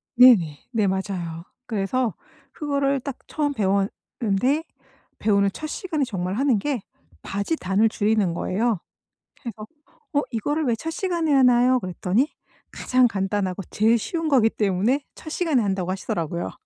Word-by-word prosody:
네네. 205 - +6
네 215 -5 +1
맞아요. 185 -4 -3 0.2
그래서 220 +1 -1 0.4
그거를 280 -2 0
딱 265 0 -6
처음 290 -2 -1
배웠는데 205 +6 0 0.6
배우는 200 -2 +3
첫 310 - -5
시간에 315 -3 -2
정말 185 -4 -3
하는 255 -3 +2
게 265 -2 -2 0.4
바지 200 +11 -2
단을 200 -2 +2
줄이는 210 -4 +1
거예요. 215 +3 0 0.6
그래서 220 -5 -7 0.5
어 285 - +3
이거를 290 +7 -1
왜 235 - +2
첫 325 +8 -5
시간에 340 -3 -1
하나요? 250 -1 +5
그랬더니 190 - 0 0.4
가장 255 0 +3
간단하고 195 -2 -2
제일 225 +3 +3
쉬운 325 - -3
거기 250 -6 +5
때문에 215 +7 +1
첫 315 - -9
시간에 315 -6 +1
한다고 190 -3 -1
하시더라고요. 170 - -3
225 Hz, 315 characters per minute, -24 LUFS, 195-275 Hz, 0.6 s, 네네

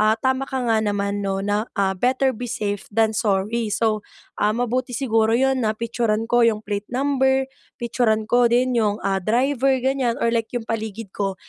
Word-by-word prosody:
Ah, 215 +1 +4
tama 260 +3 0
ka 265 -2 -2
nga 225 -2 +2
naman, 205 -1 -1
’no, 195 -1 -2
na, 205 +2 0
ah, 195 -1 +2
better 260 +3 +2
be 245 +1 -6
safe 205 -3 -3
than 225 0 +3
sorry. 215 +2 0
So, 215 -2 0 0.3
ah, 210 +1 +2
mabuti 245 +1 -1
siguro 225 -3 +2
’yon 265 +1 +2
na 215 - +1
picture-an 225 -1 -1
ko 240 - +4
’yong 215 -1 +1
plate 205 0 -4
number, 265 0 +1 0.3
picture-an 230 -2 0
ko 245 +2 +3
din 245 +1 +2
yung, 210 -2 +1
ah, 195 -1 +1
driver 265 +6 +2
ganyan, 260 -3 +1
or 235 - +3
like 230 -1 0
yung 240 -2 -2
paligid 220 -2 -4
ko 195 -2 -2
225 Hz, 190 wpm, -22 LUFS, 210-250 Hz, 0.3 s, Ah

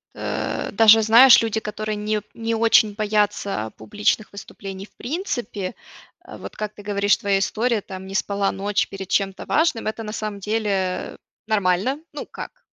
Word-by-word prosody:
э, - - -3
даже 225 +1 +7
знаешь, 230 +4 +8
люди 225 -1 -1
которые 215 0 -4
не 210 0 -1
не 230 0 -2
очень 220 -2 +4
боятся, 205 - 0
а, - - -6
публичных 210 - -1
выступлений 195 -1 -8
в - - -25
принципе, 245 - -4 0.5
а, - - -11
вот - - -9
как 215 0 -4
ты 205 - -12
говоришь 205 0 +2
твоя 200 -1 +1
история 225 +2 0
там 190 -1 -9
не 195 - -7
спала 200 0 0
ночь 200 +1 -1
перед 195 -1 -8
чем-то 195 -1 -1
важным, 305 -9 +1
это 220 +1 -3
на 210 -1 -6
самом 215 -2 -4
деле, 210 +2 -1
э, 185 -2 -2 0.3
нормально. 210 +6 +1
Ну - - -6
как. - - -10
210 Hz, 170 wpm, -22 LUFS, 195-225 Hz, 0.5 s, знаешь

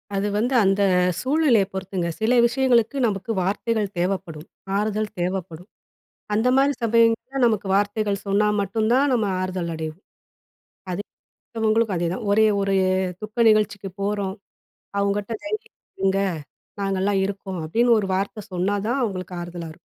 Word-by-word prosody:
அது 195 +1 0
வந்து 245 +5 0
அந்த 195 +1 +2 0.4
சூழ்நிலையை 260 -7 +3
பொறுத்துங்க. 190 -2 -3
சில 220 +3 +2
விஷயங்களுக்கு 245 +1 +2
நமக்கு 200 +1 -3
வார்த்தைகள் 210 +3 0
தேவைப்படும். 175 -4 -2 0.3
ஆறுதல் 215 +1 -1
தேவைப்படும். 180 0 -4 0.6
அந்த 220 +4 +2
மாதிரி 275 +1 +4
சமயங்கள்ல 230 +3 +2
நமக்கு 215 -4 +1
வார்த்தைகள் 205 0 0
சொன்னா 200 +2 +3
மட்டும் 215 +3 -1
தான் 275 +2 +3
நம்ம 225 -4 +2 0.2
ஆறுதல் 185 -2 -3
அடைவோம். 160 +3 -6 0.9
அது 180 +3 -2 0.7
உங்களுக்கும் 220 -2 +2
அதேதான். 175 +6 -2
ஒரே 220 +1 +5
ஒரு 195 0 +1 0.5
துக்க 215 +2 -1
நிகழ்ச்சிக்கு 205 -2 +1
போறோம், 200 -1 -1 0.7
அவங்ககிட்ட 200 +2 -1
தைரியமா 430 +7 -4 0.3
இருங்க 195 0 +2 0.6
நாங்கலாம் 195 0 +1
இருக்கோம். 195 -2 -5
அப்படின்னு 230 +8 +3
ஒரு 195 - -3
வார்த்த 200 +2 -3
சொன்னா 185 +3 0
தான் 270 +3 0
அவங்களுக்கு 185 -4 -4
ஆறுதலா 175 -1 -6
இருக்கும். - - -20
205 Hz, 135 wpm, -23 LUFS, 190-225 Hz, 0.9 s, ஒரே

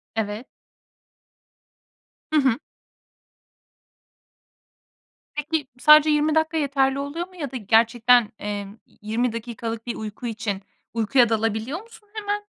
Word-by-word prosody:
Evet. 220 +2 -3 1.9
Hı 310 - +5
hı. 260 -4 +2 2.8
Peki, 295 -1 -2
sadece 305 +2 +7
20 300 +1 +2
dakika 315 0 +1
yeterli 275 -2 +1
oluyor 305 +5 -4
mu 370 - -20
ya 290 -7 -5
da 260 - -4
gerçekten, 230 +1 +4
emm, 205 0 -5
yi - - -29
20 225 +3 -1
dakikalık 230 0 -5
bir 235 - -2
uyku 220 +3 -6
için, 210 -3 -3 0.3
uykuya 235 +2 +3
dalabiliyor 225 - -1
musun 445 -2 -18
hemen? 415 -1 -3
245 Hz, 115 wpm, -24 LUFS, 225-300 Hz, 2.8 s, sadece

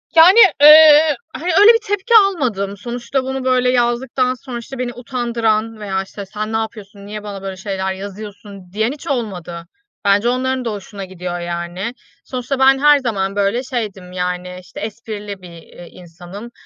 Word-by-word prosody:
Yani, 355 +7 +8 0.2
eee, 305 0 +8 0.2
hani, 350 +4 -3
öyle 425 +3 +8
bir 455 - +2
tepki 410 +3 -1
almadım. 215 - -3
Sonuçta 240 +4 -3
bunu 265 0 -4
böyle 255 -1 +2
yazdıktan 250 +1 0
sonra, 255 -1 -8
işte, 265 +3 -9
beni 245 -1 -3
utandıran 230 -3 -2
veya, 195 -2 -2
işte, 200 +1 -9
"Sen 215 +3 -5
ne - - +1
yapıyorsun, 210 -2 -7
niye 210 +1 -7
bana 200 -2 -7
böyle 190 -1 -6
şeyler 190 -1 -3
yazıyorsun?" 200 -1 -10
diyen 220 +3 0
hiç 290 - -10
olmadı. 180 -10 -4 0.4
Bence 200 +4 +3
onların 255 0 -1
da 230 - -1
hoşuna 200 -1 -8
gidiyor, 180 -1 -6
yani. 175 +5 -5 0.3
Sonuçta 255 +1 -4
ben 270 0 +5
her 295 0 +5
zaman 200 -6 -2
böyle 205 +5 0
şeydim, 210 -8 -5
yani, 180 0 -4
işte, 180 - -12
esprili 210 -2 -7
bir, 180 - -11
eee, 170 +1 -13
insanım. 180 +6 -12
215 Hz, 165 wpm, -18 LUFS, 195-255 Hz, 0.4 s, Yani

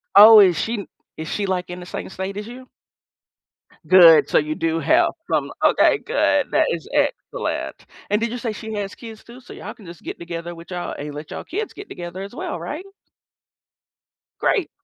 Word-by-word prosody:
Oh, 215 +2 +10
is 185 -4 +6
she 220 -4 -3 0.3
is 160 - -6
she, 205 - -2
like, 180 -2 -2
in 180 0 -6
the 180 - -9
same - - -6
state 190 +1 -5
as 210 - -5
you? 255 +2 -11 1.2
Good, 170 -4 +8
so, - - +3
you 155 +1 -2
do 165 0 -1
have 335 - +3 0.2
some - - 0
Okay, - - +4
good, - - +1
that - - +3
is - - -4
excellent. - - -2 0.2
And 210 +1 +2
did 230 0 -1
you 245 - -4
say 230 -2 -3
she 220 +1 -7
has 205 -1 -4
kids, 225 -2 -11
too? 240 +2 -13
So, 245 - -12
y'all - - -8
can 210 - -17
just 170 0 -11
get - - -6
together 170 0 -6
with 170 +2 -13
y'all 175 -1 -4
and 145 0 -6
let 150 +1 -8
y'all - - -6
kids 420 +5 -5
get 405 - -11
together, 175 +2 -7
as 200 - -9
well, 175 - -5
right? 300 - -6 1.5
Great. 390 -8 +1
195 Hz, 200 wpm, -21 LUFS, 170-230 Hz, 1.5 s, Oh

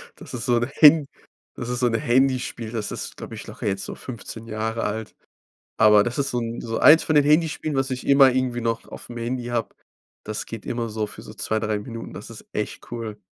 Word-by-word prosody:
das - - -12
ist 120 -2 -4
so 120 -1 +3
'n 120 +2 0
Han 150 -1 +8 0.5
das 120 - -5
ist 125 0 -2
so 125 - +3
'n 115 - -1
Handyspiel. 130 -3 +1
Das 110 -3 -3
ist, - - -6
glaube - - -8
ich, - - -8
locker - - -5
jetzt 95 -1 -1
so - - -6
15 115 -2 -8
Jahre 110 +1 -2
alt. 110 +1 -4 0.6
Aber 105 -1 +7
das 120 +3 -3
ist 140 -1 0
so 125 - -1
'n 115 0 -4
so 115 -1 -3
eins 160 +2 +7
von 155 - +1
den 145 -1 +6
Handyspielen, 155 0 +2
was 135 0 0
ich 125 -1 -4
immer 140 -1 +7
irgendwie 125 -1 0
noch 115 -1 -1
auf'm 120 - -9
Handy 120 +1 -3
habe. 120 -2 -2 0.5
Das 110 0 -4
geht 115 -2 -8
immer 120 -1 -2
so 110 0 -2
für - - -10
so - - -11
2, 110 - -1
3 105 -1 -1
Minuten, 115 +2 -8
das - - -9
ist - - -11
echt - - -4
cool. 115 -3 -5
120 Hz, 230 wpm, -24 LUFS, 110-130 Hz, 0.6 s, Han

